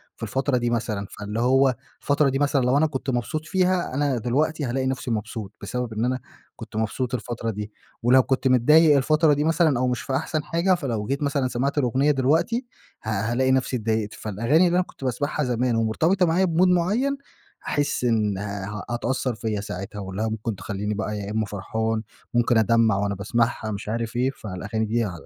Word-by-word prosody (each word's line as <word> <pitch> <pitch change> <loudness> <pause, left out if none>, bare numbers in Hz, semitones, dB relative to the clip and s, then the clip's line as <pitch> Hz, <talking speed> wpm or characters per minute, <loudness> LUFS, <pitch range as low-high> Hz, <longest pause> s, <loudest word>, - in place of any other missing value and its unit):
في - - -11
الفترة 135 -1 0
دي 120 0 0
مثلًا، 110 -4 -2
فاللي 105 +2 -4
هو 130 +1 +4 0.3
الفترة 145 0 +2
دي 135 +1 -1
مثلًا 145 -1 +2
لو 125 +3 +3
أنا 160 - +4
كنت 135 -2 -4
مبسوط 130 +5 -2
فيها 185 -3 +1
أنا 140 -2 +1
دلوقتي 145 +6 0
هالاقي 130 +1 -1
نفْسي 130 -1 -2
مبسوط، 105 -2 -4
بسبب 125 +2 -3
إن 110 +2 -1
أنا 130 0 0 0.4
كنت - - -10
مبسوط 110 +3 -2
الفترة 120 -1 -3
دي، 105 0 -5 0.3
ولو 130 +2 +6
كنت 130 +1 0
متضايق 150 +5 +6
الفترة 155 +2 +3
دي 145 - +1
مثلًا 160 -4 +3
أو 130 - +1
مش 125 -1 -1
في 130 - -3
أحسن 155 +2 -1
حاجة، 170 +4 +2
فلو 120 -11 -3
جيت 140 +3 -1
مثلًا 140 -2 +1
سمِعت 130 +4 -1
الأغنية 135 +2 +2
دلوقتي 155 - +1 0.4
ه 110 - -4
هالاقي 120 +5 +1
نفْسي 130 0 +1
اتضايقت، 110 -1 -1
فالأغاني 115 - +2
اللي 175 - +1
أنا 180 - +3
كنت - - -14
باسمَعها 145 +4 -1
زمان 125 -1 0
ومرتبطة 160 - +2
معايا 170 +3 +2
بmood 175 +1 +3
معيّن 205 +11 +2 0.5
هاحس 145 -3 -1
إن 110 -4 +1
آآ 100 +1 -5
هتأثّر 120 +1 -1
فيَّ 110 -3 -2
ساعتها 100 0 -6
واللي 95 +1 -5
هي 110 - +1
ممكن 110 0 -3
تخلّيني 105 +2 -3
بقى 105 0 -3
يا 100 0 -5
إمّا 110 0 0
فرحان، 110 +2 -2 0.3
ممكن 120 0 +3
أدمّع 110 0 +4
وأنا 100 0 -1
باسمَعها 110 +2 -1
مش 100 0 -5
عارف 115 +1 -3
إيه، 125 +2 +1
فالأغاني 105 0 -4
دي 115 +2 0
ع 105 - -2
125 Hz, 190 wpm, -24 LUFS, 110-145 Hz, 0.5 s, ولو